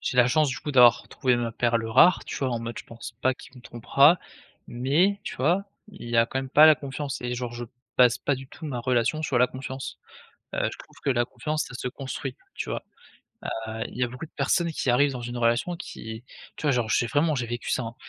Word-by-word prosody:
J'ai 125 - -3
la 125 - +6
chance, 150 +4 +3
du 130 - -3
coup, 150 - -5
d'avoir 125 -4 +6
trouvé 125 -2 +1
ma 120 -1 -2
perle 115 -1 0
rare, 130 +10 +5
tu - - -5
vois, 135 -2 -1
en 120 -1 -2
mode, 115 0 -5
je - - -8
pense 115 0 -10
pas 130 0 +3
qu'il 130 - -15
me 125 - -13
trompera 140 +8 +4 0.5
mais, 155 +12 +1
tu - - -5
vois, 170 +9 +2 0.2
il 160 - -10
y 120 - 0
a 115 - +6
quand 130 - -3
même 135 0 -4
pas 150 +4 +7
la 155 - +8
confiance 140 -1 -5
et 125 0 -3
genre, 120 -1 -4
je 120 0 -5 0.3
base 125 -2 +6
pas 140 - 0
du 130 0 -9
tout 165 - -12
ma 130 -5 -3
relation 125 +5 +1
sur 135 -5 +1
la 125 - +5
confiance. 130 +1 -7 0.6
Heu, - - +1
je - - -9
trouve - - -15
que - - 0
la 120 -2 +2
confiance, 155 +4 -3
ça 125 - -10
se 125 - -3
construit, 135 0 -6 0.2
tu - - -4
vois? - - -3 0.9
Heu, 110 0 -4
il - - -11
y 125 - +2
a - - +1
beaucoup 125 +5 -8
de 160 - -19
personnes 170 -2 +1
qui 145 - -2
arrivent 140 +4 +4
dans 125 - -6
une 120 +1 -5
relation 120 +9 +1
qui 110 -9 -8 0.3
tu - - -10
vois, 150 - +3
genre, 120 -4 0
j'ai 120 - +2
vraiment 150 +5 +2
j'ai 125 -3 -1
vécu 120 +1 -4
ça, 130 - 0
hein, 115 +1 -7
125 Hz, 250 wpm, -26 LUFS, 120-145 Hz, 0.9 s, la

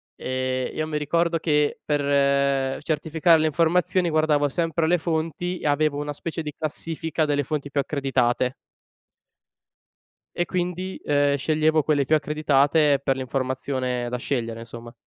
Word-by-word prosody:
e 130 0 -2
io 155 0 -2
mi 150 - -2
ricordo 165 +3 +1
che 150 -2 +1
per 140 -2 +1
certificare 160 +2 +2
le 155 - +2
informazioni 170 +3 +2
guardavo 155 -2 +2
sempre 165 +2 0
le 180 - +3
fonti 165 +2 -2
e - - -3
avevo 145 0 +1
una 145 0 -4
specie 165 +3 -5
di 150 -1 -5
classifica 160 +1 -2
delle 145 -1 0
fonti 145 0 -3
più 140 0 0
accreditate. 130 -3 0 1.8
E 175 - 0
quindi, 180 +1 -3
ehm, 145 -1 +2
sceglievo 155 +2 +2
quelle 145 -2 +1
più 155 - +3
accreditate 150 -1 +2
per 135 -1 +1
l'informazione 130 -1 -2
da 125 - -3
scegliere, 115 -3 -3
insomma. 115 0 -10
150 Hz, 140 wpm, -24 LUFS, 135-160 Hz, 1.8 s, le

